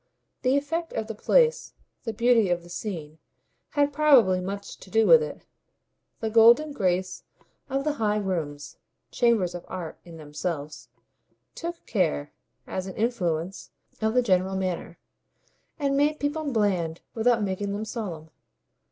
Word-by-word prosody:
The 260 +2 +3
effect 330 +4 -2
of 220 - -2
the 225 - -5
place, 475 - +2 0.3
the 225 - -1
beauty 230 -2 +3
of 175 -1 0
the 175 - -14
scene, 160 -5 -6 0.6
had 285 0 +3
probably 265 -12 +5
much 200 +2 -6
to - - -14
do 225 +2 +3
with 485 -1 +8
it; 470 - -6 0.8
the 220 -1 -2
golden 235 +7 +6
grace 185 -4 -1 0.5
of 270 0 -1
the 300 0 0
high 210 -1 +2
rooms, 160 -8 -3 0.3
chambers 225 -8 +2
of 175 - -7
art 175 -4 -6
in 170 -2 -12
themselves, 150 0 -5 0.6
took 340 0 -6
care, 70 - 0 0.3
as 185 0 -4
an 190 - -7
influence, 185 -6 -2 0.3
of 220 +2 +1
the 250 - +4
general 190 -3 +2
manner, 185 -2 -3 0.8
and 280 -2 0
made 295 +2 +2
people 290 0 -2
bland 185 -8 0
without 230 -1 +2
making 200 +1 -2
them 205 +2 -3
solemn. 175 -9 -6
210 Hz, 145 wpm, -26 LUFS, 180-250 Hz, 0.8 s, with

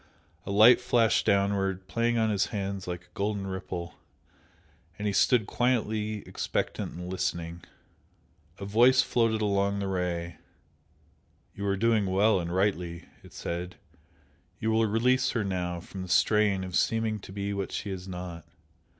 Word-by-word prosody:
A - - -2
light 110 +5 +7
flashed 115 -6 +2
downward, 100 -2 +1
playing 115 +5 0
on 110 -1 +2
his 100 -2 +1
hands 100 -2 -4
like 90 -1 -5
a 90 0 -28
golden 100 0 -2
ripple, 95 -2 -6 1.0
and 105 - -5
he 105 - 0
stood 115 +2 +3
quietly 110 -4 -1
expectant - - -3
and 90 +1 -7
listening. 85 -2 -3 0.9
A 100 - -6
Voice 120 +5 +5
floated 115 -2 +1
along 100 -1 +1
the 100 -1 -2
Ray 85 -3 -2 1.2
"You 100 0 -4
are 100 0 +1
doing 110 -1 +2
well 95 +2 +3
and 85 -1 -4
rightly!" 90 -3 -1 0.2
it - - -15
said 90 +1 -5 0.8
"You 110 +1 -1
will 110 0 +3
release 125 +5 +2
her 115 - 0
now 90 -3 -2
from 95 +2 -9
the 95 - -7
strain 100 +1 +3
of 90 -2 -5
seeming 110 -1 +1
to 95 - -11
be 100 +1 -3
what 100 -1 -3
she 100 - -4
is 95 0 -6
not. 90 -3 -7
100 Hz, 155 wpm, -28 LUFS, 90-110 Hz, 1.2 s, light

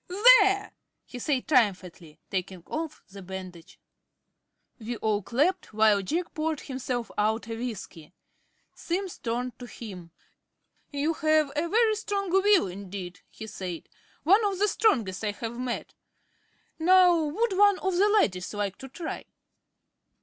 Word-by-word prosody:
"There!" 400 0 +5 0.3
he 250 - -9
said 265 0 -1
triumphantly, 185 - 0
taking 185 -2 -4
off 315 0 -5
the 200 0 -10
bandage. 185 -2 -9 1.0
We 230 +1 -5
all 215 -1 0
clapped, 280 - 0
while 215 -2 +4
Jack 335 - -3
poured 310 -1 -2
himself 255 -3 -4
out 220 +2 0
a 225 - -4
whisky. 215 -9 -7 0.6
Simms 365 +1 -4
turned 245 +2 -3
to 245 - -8
him. 190 -9 -9 0.8
"You 290 +3 -1
have 310 -2 +2
a 325 +3 -1
very 450 +2 +3
strong 400 -3 -3
will 385 +1 +4
indeed," 185 -1 -7
he 220 - -9
said, 185 -5 -7 0.3
"one 390 +9 +5
of 395 -2 0
the 410 +2 +2
strongest 230 - +1
I 210 -1 -1
have 230 +3 -6
met. 250 -1 -4 0.9
Now, 360 +1 +6
would 385 +8 -1
one 405 0 +5
of 380 -1 -1
the 400 +4 +4
ladies 190 - +1
like 200 -2 -3
to 265 - -9
try?" 325 +5 -6
250 Hz, 140 wpm, -27 LUFS, -, 1.0 s, Now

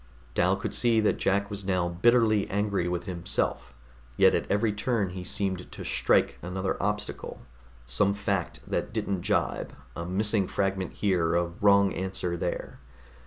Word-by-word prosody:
Dal 90 +2 +3
could 100 - -4
see 115 -2 +3
that 105 - +1
Jack 100 +1 +1
was 100 -1 -4
now 90 -2 +1
bitterly 110 +3 +3
angry 100 -3 0
with 90 0 -2
himself, 85 -8 -2 0.4
yet - - +6
at - - -1
every 105 +2 +2
turn 105 -2 0
he 90 0 -6
seemed 95 -1 -2
to - - -8
strike - - +2
another 95 +2 -2
obstacle 105 -6 -3 0.4
some 95 +12 +2
fact 100 -2 -2
that - - -2
didn't 95 -3 -1
jibe, - - -1 0.2
a 85 - -4
missing 100 +2 +1
fragment 95 -2 -1
here, 90 -5 +1
a 85 0 +2 0.2
wrong 100 -1 +5
answer 95 -2 -2
there. 85 +1 -4
95 Hz, 155 wpm, -28 LUFS, 90-105 Hz, 0.4 s, yet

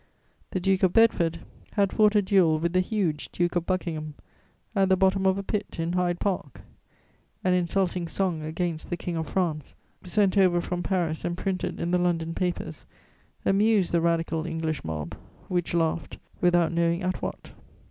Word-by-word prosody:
The 185 - -2
Duke 190 +1 +1
of 185 -2 +3
Bedford 170 -8 +3 0.3
had 200 -2 +2
fought 215 -1 +4
a 205 - +4
duel 185 -5 +4
with 170 +2 -1
the 185 - +4
huge 185 -6 -1
Duke 175 0 0
of 175 -1 0
Buckingham, 160 -5 -2 0.6
at 195 -1 +3
the 190 - +4
bottom 190 0 +3
of 190 0 +3
a 200 - -3
pit, 205 +1 -3
in 165 +1 -1
Hyde 180 -1 0
Park; 180 - -3 0.8
an 185 - +3
insulting 180 0 0
song 175 -2 -1
against 160 +1 -3
the 175 - -2
King 175 -1 -4
of 160 -2 -2
France, 160 -6 -2 0.3
sent 195 +2 +2
over 180 -2 +4
from 175 +1 -3
Paris 170 -3 -1
and 175 0 -2
printed 190 -2 -2
in 170 - -1
the 180 - +3
London 165 -2 0
papers, 180 -1 -3 0.6
amused 200 -1 +3
the 170 - +2
Radical 165 -1 0
English 160 -2 -2
mob, 80 -2 -4 0.4
which 175 -1 -1
laughed 165 -2 -1 0.2
without 175 -2 +3
knowing 170 +1 +1
at 185 0 -2
what. - - -6
175 Hz, 175 wpm, -26 LUFS, 165-190 Hz, 0.8 s, fought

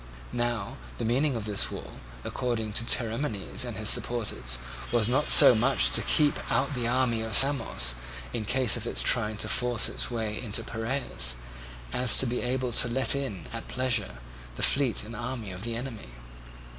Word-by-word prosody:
Now 120 -4 -3 0.2
the - - -4
meaning 130 +4 0
of 110 -3 -5
this 105 -2 -1
wall, - - -10 0.3
according 115 -4 -4
to 115 - 0
Theramenes 115 -1 -2
and 120 -5 -7
his 110 -1 +6
supporters, 105 - 0 0.3
was 115 -2 +1
not 135 +5 0
so - - +10
much 120 +4 +2
to - - +3
keep 150 -2 +1
out 140 +2 0
the 120 -3 -2
army 125 -2 0
of 110 -2 -2
Samos, 125 - +4 0.4
in 110 - -4
case 125 +1 0
of - - -5
its - - +1
trying 110 0 0
to 110 - -1
force 120 +1 +1
its - - -1
way 110 -3 -4
into 115 -1 -1
Piraeus, 110 - -4 0.6
as 125 -2 +4
to - - +4
be 125 0 -3
able 125 0 -2
to 125 - +3
let 130 +3 +1
in, 130 -11 -4
at 115 - -7
pleasure, 120 - -2 0.4
the - - -4
fleet 135 -4 +1
and 115 +2 -10
army 120 -2 -6
of 90 0 -9
the 115 0 -4
enemy. 115 - -7
115 Hz, 180 wpm, -26 LUFS, 110-125 Hz, 0.6 s, so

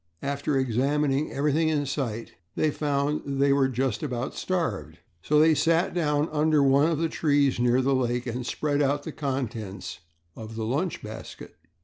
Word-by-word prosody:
After 140 0 -1
examining 135 +3 +1
everything 150 +3 +1
in 150 -2 0
sight 120 -5 -3 0.2
they 155 - +1
found 145 0 -1
that 140 - -6
they 140 0 +3
were 135 -1 +3
just 130 -2 -1
about 125 -3 -3
starved, 165 - -2 0.2
so 150 - +2
they 160 +1 +6
sat 165 +3 +2
down 150 -3 +1
under 150 -1 +3
one 140 +3 +4
of 165 - 0
the 165 +2 +1
trees 145 -5 +1
near 125 +1 +3
the 135 +1 +2
lake 125 -1 0
and 125 +1 -3
spread 145 +3 -1
out 145 +1 +1
the - - -5
contents 120 -8 -4 0.4
of 110 0 -8
the 110 -1 -3
lunch 150 +10 -2
basket. 110 +1 -9
140 Hz, 170 wpm, -26 LUFS, 125-150 Hz, 0.4 s, they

